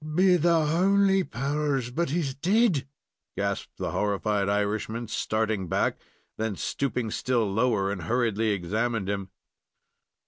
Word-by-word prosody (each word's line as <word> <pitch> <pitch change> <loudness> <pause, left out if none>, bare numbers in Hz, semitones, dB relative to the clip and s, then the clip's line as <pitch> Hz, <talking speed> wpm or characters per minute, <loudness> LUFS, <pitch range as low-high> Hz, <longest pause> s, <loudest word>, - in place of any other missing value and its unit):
"Be 185 +1 +5
the 165 -1 +3
howly 195 +4 +3
powers, 140 -1 -1
but 170 +4 -1
he's 150 -3 -1
dead!" 180 - +2 0.5
gasped - - -3
the - - -3
horrified 105 -1 0
Irishman, 105 +3 -1
starting 110 -3 -1
back, - - +1 0.5
and - - 0
then 110 -3 -1
stooping 125 0 -2
still 120 -1 0
lower, 105 -1 +1
and 95 -3 -4
hurriedly 115 +3 0
examining 105 +3 -1
him. 100 -1 -3
120 Hz, 130 wpm, -27 LUFS, 105-150 Hz, 0.5 s, Be